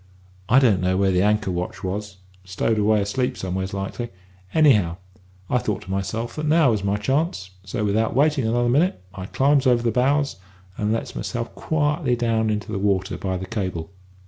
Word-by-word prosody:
I 125 - +5
don't 115 -9 +4
know 95 0 +1
where 95 0 +3
the 90 0 +2
anchor 105 -1 +2
watch 90 0 -4
was; 100 +1 -4 0.3
stowed 95 +4 -1
away 105 0 +3
asleep 125 +6 -1
somewheres, 95 +1 -3
likely. 100 +5 -4 0.4
Anyhow, 105 - +4 0.5
I 125 - +1
thought 105 -4 -3
to 95 - -8
myself 100 +5 -3
that 155 0 -2
now 155 -4 +4
was 105 -3 -1
my 100 +1 +1
chance, 130 - -1
so, 105 +3 -3
without 110 +3 +1
waiting 145 -3 +2
another 120 +2 +1
minute, 150 - +2
I 95 0 -7
climbs 140 +2 +2
over 120 -2 +3
the 115 - +2
bows, 140 +4 +1 0.4
and 105 -1 -1
lets 115 - -3
myself 120 -2 -4
quietly 150 -3 0
down 115 -2 +1
into 105 +1 -2
the 100 - -2
water 95 -1 0
by 95 -1 -3
the 95 - -5
cable. 95 -6 -4
110 Hz, 185 wpm, -23 LUFS, 95-125 Hz, 0.5 s, I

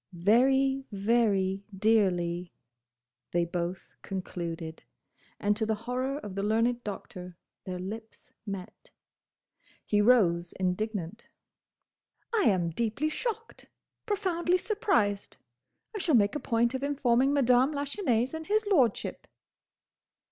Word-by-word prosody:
"Very, 265 +9 +3
very 200 -2 +1
dearly!" 180 -5 +1 0.8
they 175 0 +1
both 175 +1 -4
concluded. 170 -4 -5 0.6
And 205 0 +2
to 220 - -1
the 220 0 +1
horror 250 +5 -3
of 210 -9 -7
the 195 - -2
learned 230 +3 +1
Doctor, 180 -4 -7 0.3
their 185 -1 -4
lips 220 +5 -8
met. 195 -4 -8 1.0
He 210 -1 +2
rose, 180 -7 +3
indignant. 190 +1 -3 1.1
"I 430 -4 +3
am 175 -5 +2
deeply 235 - -1
shocked. 455 +6 -5 0.4
Profoundly 365 -4 +1
surprised. 360 - 0 0.6
I - - -2
shall 325 -6 +2
make 205 -3 +4
a 295 - -2
point 235 0 +1
of 260 - -3
informing 270 -2 +2
Madame 260 -1 +4
Lachesnais 280 - -1
and 320 0 -6
his 430 +1 +2
lordship." 275 - +1
225 Hz, 110 wpm, -29 LUFS, 190-270 Hz, 1.1 s, make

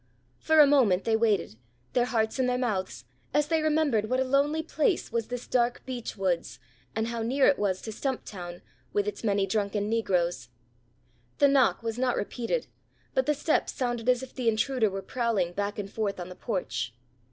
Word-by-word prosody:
For 315 -1 +3
a 300 - +10
moment 250 -10 +4
they 225 - +2
waited, 215 - +1 0.4
their 245 - +3
hearts 225 0 0
in 255 - +2
their 250 0 +1
mouths, 190 - -2 0.3
as 295 0 +3
they 325 -1 +2
remembered 300 -9 +2
what 255 - +1
a - - +3
lonely 285 +4 +1
place 320 +2 0
was 230 -1 -1
this 245 0 -5
dark 240 -1 0
beech 245 -4 -5
woods, 185 -3 -1 0.4
and 220 +1 -1
how 235 -1 -3
near 265 +5 +2
it 280 - +4
was 190 -3 0
to 220 - -5
Stumptown, 195 -8 -5 0.3
with 205 0 +1
its 210 - -4
many 200 -2 +2
drunken 205 0 -1
negroes. 180 - 0 0.9
The 285 - +5
knock 250 -8 +3
was 225 +1 -3
not 255 -1 +1
repeated, 245 - -2 0.5
but 260 +1 +1
the 300 - +3
steps 305 +2 0
sounded 240 -2 -1
as 250 0 +3
if 260 - -9
the 250 -3 +1
intruder 225 +1 +1
were 195 0 -5
prowling 225 -8 0
back 205 +2 -2
and 205 -2 -3
forth 200 -1 -3
on 175 0 -6
the 180 - -9
porch. 125 - -3
230 Hz, 190 wpm, -28 LUFS, 200-260 Hz, 0.9 s, a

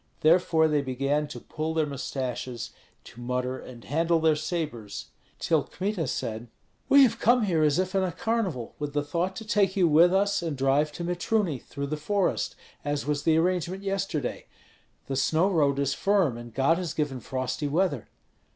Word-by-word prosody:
Therefore 160 0 +4
they 150 -2 +2
began 140 +3 -1
to 125 - -8
pull 155 +5 -4
their 160 -1 +2
mustaches, 130 -3 -4 0.3
to 120 - -13
mutter 125 +1 -2
and 120 -2 -11
handle 165 +4 +1
their 160 -1 +3
sabres, 150 - -4 0.3
till 160 -3 +2
Kmita 185 -4 -3
said, 110 -1 -3 0.4
"We 280 0 +8
have 230 -3 +2
come 240 0 +4
here 175 -6 +1
as 150 0 +3
if 185 0 0
in 195 - +2
a 185 -1 0
carnival, 185 - -2
with 145 -1 -4
the 145 0 0
thought 170 +6 -2
to 220 - -7
take 200 -2 +1
you 180 -3 +5
with 165 +3 +6
us 200 +1 +2
and 160 -5 -3
drive 135 +3 +2
to 170 - -5
Mitruny 175 - 0
through 140 +3 -6
the 155 +2 -3
forest, 195 +5 0 0.3
as 145 0 -2
was 145 0 0
the 160 0 +3
arrangement 180 +2 0
yesterday. 195 -9 -2 0.6
The 135 - -3
snow 160 +8 +2
road 145 -6 +2
is 140 -1 +1
firm, 195 - +2
and 120 0 -9
God 140 +8 +2
has 175 -4 -4
given 145 -4 -1
frosty 130 +4 -3
weather." 145 - 0
155 Hz, 180 wpm, -27 LUFS, 140-185 Hz, 0.6 s, We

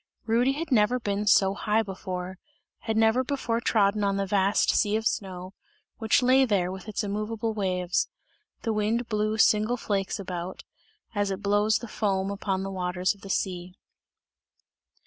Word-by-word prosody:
Rudy 240 +4 +2
had 315 +2 -5
never 240 +1 +3
been 205 -2 -2
so 195 -1 +5
high 215 +2 +1
before, 185 -2 -6 0.4
had 220 -1 -2
never 225 +3 +3
before 245 -4 -2
trodden 210 -2 +2
on 200 0 +1
the 195 - 0
vast 195 +1 +2
sea 210 -1 +2
of 220 0 -1
snow, 185 -3 -3 0.5
which 225 +2 +2
lay 260 +2 +5
there 195 -7 +1
with 190 +2 -8
its 215 +1 -2
immoveable 215 +2 -2
waves. 185 -3 -1 0.5
The 225 - 0
wind 220 +3 0
blew 215 0 0
single 220 +2 +3
flakes 200 -2 -2
about, 180 -1 -6 0.5
as 205 -2 0
it 195 +1 -4
blows 205 +2 +3
the 235 - -8
foam 195 -3 -1
upon 195 -1 -2
the 195 - -4
waters 180 0 -1
of 200 - -22
the 195 - -10
sea. 180 -2 -2
205 Hz, 165 wpm, -27 LUFS, 190-220 Hz, 0.5 s, so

